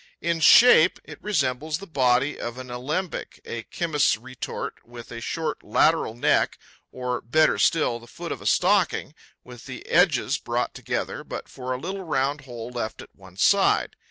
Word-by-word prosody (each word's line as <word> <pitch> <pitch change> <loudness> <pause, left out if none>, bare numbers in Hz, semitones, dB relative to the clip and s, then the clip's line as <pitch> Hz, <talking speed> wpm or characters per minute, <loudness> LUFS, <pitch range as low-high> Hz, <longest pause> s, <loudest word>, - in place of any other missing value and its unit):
In 170 0 -1
shape, 180 +1 +7
it - - -12
resembles 150 -5 -1
the 195 - -10
body 130 -3 +1
of 120 +1 -5
an 130 -1 -8
alembic, 150 +9 -4
a 120 - -5
chemist's 150 0 0
retort 125 +2 -6
with 120 0 -12
a 115 -1 -7
short 160 +4 -3
lateral 160 -8 +2
neck, 120 - +2 0.3
or, 125 -1 -3
better 155 +7 +2
still, 140 -8 +2
the 120 - -15
foot 170 +7 -7
of - - -5
a - - -4
stocking, 185 -5 +2 0.3
with 125 -1 -12
the - - -8
edges - - +3
brought - - -2
together, - - -4
but - - -7
for 130 -1 -7
a 125 - -1
little 190 +6 -5
round 140 -4 -1
hole 120 -2 -8
left 120 -3 -4
at - - -18
one 95 -2 -16
side. 200 - +3
135 Hz, 170 wpm, -24 LUFS, 120-165 Hz, 0.3 s, shape